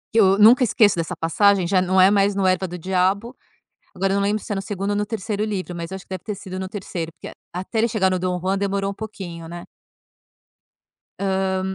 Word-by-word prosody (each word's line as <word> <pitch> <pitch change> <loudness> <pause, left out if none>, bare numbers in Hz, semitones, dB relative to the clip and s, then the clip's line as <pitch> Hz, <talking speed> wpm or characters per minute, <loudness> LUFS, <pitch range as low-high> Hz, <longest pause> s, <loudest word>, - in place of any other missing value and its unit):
Que - - +5
eu 195 -1 +4
nunca 230 +5 +7
esqueço 210 -3 +4
dessa 170 +1 -3
passagem, 190 +4 +3
já 185 +1 +3
não 185 +1 +2
é 185 +1 +7
mais 200 0 +2
no 195 -1 0
Erva 185 0 +2
do 180 0 -7
Diabo, 190 +7 0 0.6
agora 195 +1 0
eu - - +1
não 200 - +1
lembro 210 +2 0
se - - -12
é - - 0
no 195 - -3
2º 195 0 -3
ou - - -1
no 205 - 0
3º 210 0 -3
livro, 190 -4 -4
mas 170 0 -6
eu 190 - -5
acho 190 - -12
que - - -40
deve 185 -2 -6
ter 210 - -3
sido 185 -1 -8
no 190 0 -5
3º, 175 -5 -5
porque - - -10
a - - -11 0.3
até 190 +5 -7
ele 225 - +4
chegar 210 -4 +1
no 185 - 0
Dom 180 0 -2
Juan 190 +2 0
demorou 195 0 -1
um - - -6
pouquinho, 190 -6 -8
né. 175 +1 -8 1.6
Hã, 190 -1 0
195 Hz, 245 wpm, -22 LUFS, 185-205 Hz, 1.6 s, nunca